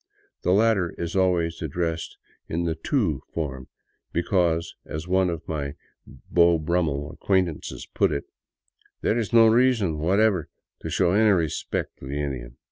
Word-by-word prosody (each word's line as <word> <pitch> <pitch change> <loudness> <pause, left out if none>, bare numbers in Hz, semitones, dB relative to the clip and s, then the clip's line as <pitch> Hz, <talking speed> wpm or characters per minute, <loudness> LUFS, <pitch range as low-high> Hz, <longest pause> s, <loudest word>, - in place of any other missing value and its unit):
The - - -1
latter 100 -3 +3
is 85 +3 -4
always 90 -3 +1
ad 80 - -3
dressed 80 +1 -3 0.3
in 85 +2 -1
the 85 -1 0
" 80 - -30
tu 95 - +1
" - - -44
form, 65 -5 -4 0.2
" - - -48
because," 85 -2 +1
as 80 +3 -6
one 95 0 +2
of 85 -1 -5
my 70 -3 -3 0.3
Beau 85 -1 +2
Brummel 75 -3 -1
acquaintances 90 -3 -1
put - - +2
it, 70 - -2 0.4
" - - -38
there 115 - +2
is 110 - -2
no 115 -1 +7
reason 110 -8 +3
whatever 95 +1 +2 0.3
to - - -5
show 85 - +2
any 110 +3 +4
re 85 -6 +3
spect - - -4
to 65 - -9
the 70 +2 -3
Indian." 65 -4 -4
85 Hz, 175 wpm, -25 LUFS, 75-95 Hz, 0.4 s, no